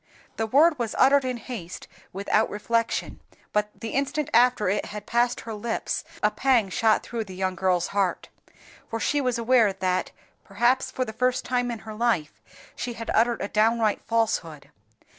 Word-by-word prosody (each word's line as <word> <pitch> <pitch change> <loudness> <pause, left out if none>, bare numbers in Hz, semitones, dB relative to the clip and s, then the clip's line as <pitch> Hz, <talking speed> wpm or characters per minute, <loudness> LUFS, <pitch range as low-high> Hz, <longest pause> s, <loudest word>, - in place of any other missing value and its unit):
The 225 - -1
word 295 +5 +4
was 230 -2 -2
uttered 275 +1 +5
in 255 -1 -2
haste, 220 -8 -8 0.2
without 200 +3 +1
reflection; 230 +2 -1 0.3
but 210 0 +1
the 225 - -5
instant 285 +3 -1
after 240 -3 +4
it 200 +3 0
had 210 0 -8
passed 240 +1 +1
her 225 - -7
lips 225 +2 -3 0.2
a - - +4
pang 245 -7 +2
shot 220 +2 +2
through 230 -2 -4
the 190 -2 -10
young 185 0 -1
girl's 185 -1 0
heart, 195 -3 -1 0.6
for 225 - -3
she 290 +5 +1
was 250 -3 0
aware 230 -2 +4
that, 185 -1 -1 0.3
perhaps 240 +6 +1
for 255 - -2
the 220 - -7
first 250 +2 0
time 245 -1 0
in 235 - -3
her 220 - -7
life, 215 -9 -1 0.3
she 245 - -4
had 230 0 -5
uttered 235 0 +2
a - - -2
downright 220 0 +2
falsehood. 215 -10 -1
225 Hz, 175 wpm, -25 LUFS, 205-245 Hz, 0.6 s, uttered